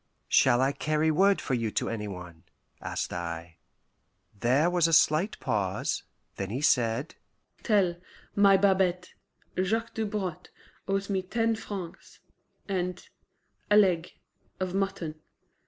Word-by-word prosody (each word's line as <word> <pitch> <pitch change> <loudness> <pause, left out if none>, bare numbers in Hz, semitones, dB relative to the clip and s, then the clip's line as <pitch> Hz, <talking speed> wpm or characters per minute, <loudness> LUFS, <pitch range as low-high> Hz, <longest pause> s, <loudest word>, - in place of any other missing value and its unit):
"Shall 125 -1 +5
I 135 +1 +3
carry 155 +2 0
word 195 +5 +4
for 135 - -3
you 115 -3 0
to - - 0
any 105 -2 -3
one?" 90 -4 -9 0.4
asked - - -3
I. 85 -1 -5 0.8
There 125 +9 +2
was 175 -2 +3
a 165 - -1
slight 160 +6 +3
pause; 95 -3 -1 0.4
then 95 -1 -3
he 120 +6 -3
said, 125 -1 +1 0.5
"Tell 195 -6 +2 0.4
my 200 -1 +6
Babette 185 -2 +1 0.5
Jacques 225 +4 -1
Dobrotte 205 -6 -3 0.4
owes 195 0 -1
me 195 -2 0
ten 225 +4 0
francs 195 -6 -8 0.5
and 180 -2 -3 0.6
a 210 - +6
leg 180 -5 +3 0.5
of 185 -1 -2
mutton. 175 -5 -2
175 Hz, 125 wpm, -28 LUFS, 120-195 Hz, 0.8 s, my